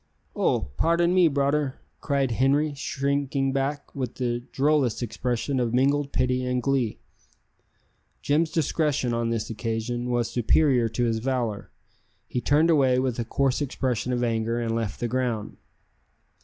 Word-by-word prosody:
"Oh! 65 - 0
pardon 170 +1 +2
me, 180 -2 +5
broder," 140 -1 0 0.2
cried 140 -4 0
Henri, 140 +5 +2
shrinking 140 -1 -1
back, 140 +2 -2
with 130 -3 -4
the 120 -2 -1
drollest 135 -5 +1
expression 120 +4 -2
of 120 -1 0
mingled 140 +2 +2
pity 125 0 0
and 125 0 0
glee. 130 -4 0 1.3
Jim's 155 +3 +2
discretion, 150 -5 0
on 115 0 0
this 115 -1 -2
occasion, 115 +2 -3
was 120 -1 +1
superior 125 0 +3
to 120 +3 -1
his 115 -2 +1
valour; 120 -4 -2 0.6
he 125 - -2
turned 155 +6 +3
away 135 -5 +4
with 130 -2 -1
a - - 0
coarse 135 +4 0
expression 125 -3 -1
of 125 0 0
anger 115 0 0
and 115 -1 -1
left 115 -3 -3
the 120 - -1
ground. 120 -4 -2
130 Hz, 145 wpm, -25 LUFS, 120-140 Hz, 1.3 s, me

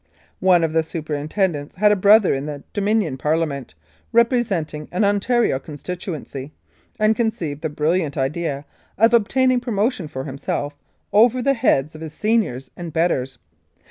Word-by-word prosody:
One 180 -2 +4
of 160 -1 0
the 160 - +3
superintendents 155 0 -2
had 210 +2 +4
a - - +4
brother 205 +1 +5
in 135 +2 -3
the 145 -2 -6
Dominion 205 -8 0
Parliament, 150 - -1 0.4
representing 220 - +1
an 180 - 0
Ontario 205 - +2
con 150 +1 -10
stituency, 155 -5 -6 0.5
and 215 +1 +3
conceived 170 -11 -2
the 160 - -2
brilliant 150 +1 0
idea 140 +1 -2 0.3
of 225 +4 +4
obtaining 255 +3 +3
promotion 225 - -1
for 130 -3 -6
himself 145 +1 -4 0.4
over 235 +4 +5
the 275 - +3
heads 160 - +1
of 155 - -11
his 160 -1 -7
seniors 200 - 0
and 170 -2 -7
betters. 135 -6 0
170 Hz, 145 wpm, -21 LUFS, 145-215 Hz, 0.5 s, brother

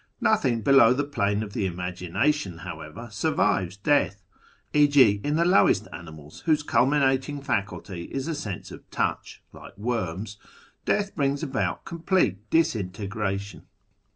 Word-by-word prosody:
Nothing 120 -4 +2
below 135 -2 +6
the 140 +3 0
plane 105 -7 -1
of 100 -2 -8
the 100 - 0
Imagination, 90 - -1
however, 80 +10 -8
survives 100 - 0
death: 100 -5 +1 0.5
e.g. 140 -9 +5
in 145 +1 0
the 165 - +3
I - - 0
lowest 180 +3 +4
animals, 80 -3 -10
whose 155 -2 +3
culminating 135 0 +2
faculty 100 - -3
is 135 +2 -4
a 165 - -1
sense 105 - -6
of - - -12
touch - - -3
'(like - - -13
worms), 105 -2 -3 0.5
death 205 -1 0
brings 140 +1 0
about 135 -3 -2
complete 165 - 0
disintegration. 100 - -1
110 Hz, 130 wpm, -26 LUFS, 95-145 Hz, 0.5 s, below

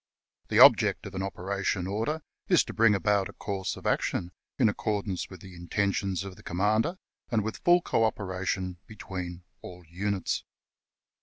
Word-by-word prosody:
The - - 0
object - - +7
of 100 - -7
an 95 - -3
operation 95 0 -2
order 115 +11 -2 0.2
is - - +5
to - - -8
bring 110 -2 +5
about 100 +1 +1
a - - -10
course 95 -3 -3
of - - -12
action 85 - 0 0.3
in 125 - +4
accordance 105 -3 -2
with 95 -3 -11
the 95 -1 -11
intentions 95 +1 -1
of 95 -2 -8
the - - -14
commander, 110 - +1 0.3
and 115 -3 +1
with 110 +1 -4
full 175 0 +4
co 115 - +1
operation 95 -3 -2
between 90 -5 -7 0.2
all 90 -1 -10
units. 95 +3 -2
100 Hz, 160 wpm, -28 LUFS, 90-105 Hz, 0.3 s, object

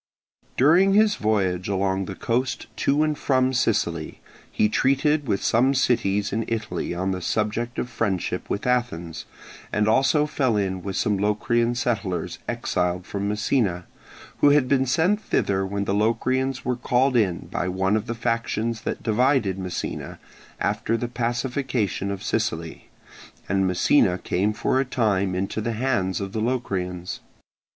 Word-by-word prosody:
During 180 +9 +5
his 215 0 +5
voyage 95 -4 0
along 95 0 0
the 95 - -6
coast 125 +5 -1
to 145 +2 +2
and 155 -1 0
from 130 -2 +1
Sicily, 85 -10 0 0.3
he 105 - +2
treated 140 +5 +1
with 100 - 0
some 130 +4 +3
cities 105 -6 +1
in 115 +2 0
Italy 110 -6 -3
on 95 +2 -1
the 90 -1 -3
subject 110 +5 -1
of - - -1
friendship 100 -7 -2
with 100 - -2
Athens, 120 -10 -1 0.5
and 105 0 +1
also 135 +6 +3
fell 135 -7 0
in 95 -2 -1
with 95 0 -5
some 105 -2 +1
Locrian 115 +3 +1
settlers 110 -7 -2
exiled 90 0 -1
from 100 0 -3
Messina, 105 -4 0 0.5
who 145 - +6
had 145 -2 +4
been 130 0 +2
sent 180 - +2
thither 95 - 0
when 100 +1 -2
the 100 - 0
Locrians 130 +5 0
were 125 - 0
called 125 +2 +1
in 95 -7 +1
by 90 - -1
one 95 +2 +1
of 110 +2 -2
the 115 - -3
factions 115 -1 -1
that - - -4
divided 115 -4 +2
Messina 90 -2 -5 0.4
after 115 - 0
the 120 - -3
pacification 120 -4 -2
of 100 -1 -4
Sicily, - - -3 0.6
and 95 0 +1
Messina 90 +1 +3
came 95 +3 0
for 130 +4 0
a - - +3
time 100 -7 0
into 95 +3 -2
the 115 +2 -2
hands 105 -6 0
of 100 -1 -4
the 110 - -2
Locrians. 95 -7 -2
110 Hz, 155 wpm, -24 LUFS, 95-130 Hz, 0.6 s, who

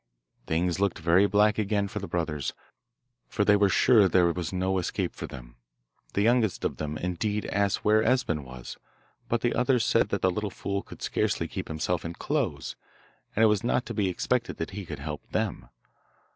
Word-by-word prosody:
Things 85 +2 0
looked 100 -2 +1
very 85 +5 +4
black 105 +1 +3
again 100 -1 0
for 105 +1 -5
the 100 - -6
brothers, 80 -5 -2 0.8
for 100 - 0
they 105 - +6
were 100 -1 +4
sure 105 +1 +5
there 85 -2 +4
was 85 -2 -4
no 95 0 0
escape 90 - -2
for - - -6
them. - - -11 0.6
The 100 - +2
youngest 115 -4 +2
of - - -2
them, 75 0 -4
indeed, 105 +5 -2
asked 100 -1 0
where 110 +1 +5
Esben 110 - +1
was, 65 -2 -9 0.5
but 120 -1 +1
the 120 - +1
others 125 -2 +2
said 110 -3 +3
that 100 - -2
that 95 - +5
little 105 +3 -2
fool 100 +1 -3
could - - -12
scarcely - - 0
keep - - -5
himself 80 +3 -2
in 85 0 -5
clothes, - - -2 0.6
and 110 - +3
it - - +8
was 105 -1 +2
not 120 +1 +1
to - - -5
be 100 -3 +1
expected 120 +7 -1
that 80 - -4
he 95 -1 -7
could 75 - -5
help 75 +1 -5
them. - - -2
100 Hz, 195 wpm, -27 LUFS, 85-105 Hz, 0.8 s, it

